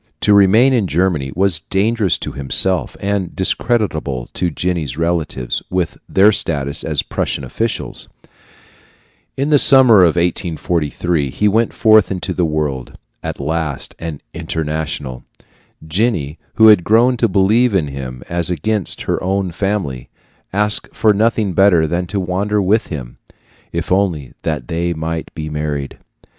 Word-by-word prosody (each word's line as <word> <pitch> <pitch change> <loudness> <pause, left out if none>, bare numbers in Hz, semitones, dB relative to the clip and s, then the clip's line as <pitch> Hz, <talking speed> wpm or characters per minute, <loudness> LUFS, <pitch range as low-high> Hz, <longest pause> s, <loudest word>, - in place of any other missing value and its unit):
To 105 - +4
remain 105 +7 +5
in 110 -6 +1
Germany 85 -5 0
was 95 -3 +1
dangerous 100 +2 0
to - - -6
himself 80 +7 0
and 100 -3 -2
discreditable 95 - -1
to 90 - -1
Jenny's 80 -5 -3
relatives, 80 -7 -2
with 90 -3 -1
their 100 +2 +5
status 70 -5 -1
as 75 -3 -1
Prussian - - -3
officials. 110 - -4 1.3
In 140 +3 -1
the 145 - +6
summer 130 -5 +7
of 85 -3 +4
1843, 85 -3 -1
he 105 +10 0
went 110 +3 +2
forth 110 -3 +4
into 95 -2 -3
the 90 - 0
world 75 -5 -3 0.2
at - - -5
last 75 -1 -3
an 80 -4 -6
"international." 80 -5 -4 0.6
Jenny, 85 - -1 0.2
who 110 0 +7
had 105 -5 +6
grown 120 +5 +3
to - - +2
believe 105 +4 +2
in 80 -6 +1
him 65 -2 -7
as 85 0 +1
against 95 +4 -2
her - - -2
own 95 0 -1
family, 90 -9 -3 0.4
asked 105 +1 -1
for 110 -1 +3
nothing 110 -2 +1
better 90 -3 +4
than 85 +3 -2
to 100 +3 -2
wander 95 +3 -1
with 105 +3 +1
him, 65 -7 -7 0.5
if - - -4
only 90 -8 0
they 80 +4 -2
might 80 +1 -4
be 80 -1 -5
married. 75 -2 -4
90 Hz, 140 wpm, -17 LUFS, 75-100 Hz, 1.3 s, summer